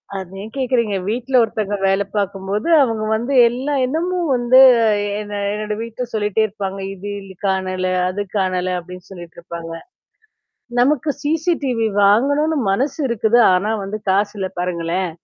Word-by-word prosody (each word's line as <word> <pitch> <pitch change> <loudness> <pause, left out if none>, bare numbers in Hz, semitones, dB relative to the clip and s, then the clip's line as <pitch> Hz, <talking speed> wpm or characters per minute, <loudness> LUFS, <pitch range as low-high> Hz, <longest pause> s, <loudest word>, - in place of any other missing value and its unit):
அத 190 -2 -5
ஏன் 215 +2 -9
கேட்கிறீங்க. 240 -6 0
வீட்ல 245 +4 -2
ஒருத்தங்க 210 -2 -2
வேல 195 +1 +2
பார்க்கும்போது, 200 - -2
அவுங்க 225 -4 0
வந்து 240 +5 -2
எல்லா 260 +5 -2
இடமும் 335 +4 -1
வந்து 245 +1 +4 0.4
எ 205 - -2
என்ன 205 -1 -5
என்னோட 210 0 -3
வீட்ல 230 +2 -5
சொல்லிட்டே 210 0 0
இருப்பாங்க. 195 -1 -5
இது 200 +2 -8 0.2
இ - - -11
காணல, 185 -1 -1 0.2
அது 200 +2 -3 0.2
காணல 185 -1 0
அப்பிடின்னு 180 +1 -10
சொல்லிட்டு 175 -3 -11
இருப்பாங்க. 170 -1 -8 1.1
நமக்கு 295 +3 +2
CCTV 300 -5 0 0.2
வாங்கணுன்னு 285 +9 +3
மனசு 265 +10 -1
இருக்குது. 235 0 +2 0.2
ஆனா 200 +4 0
வந்து 205 +2 -4
காசு 200 +2 +1
இல்ல 190 -1 -2
பாருங்களேன். 175 0 -2
210 Hz, 140 wpm, -19 LUFS, 190-250 Hz, 1.1 s, வந்து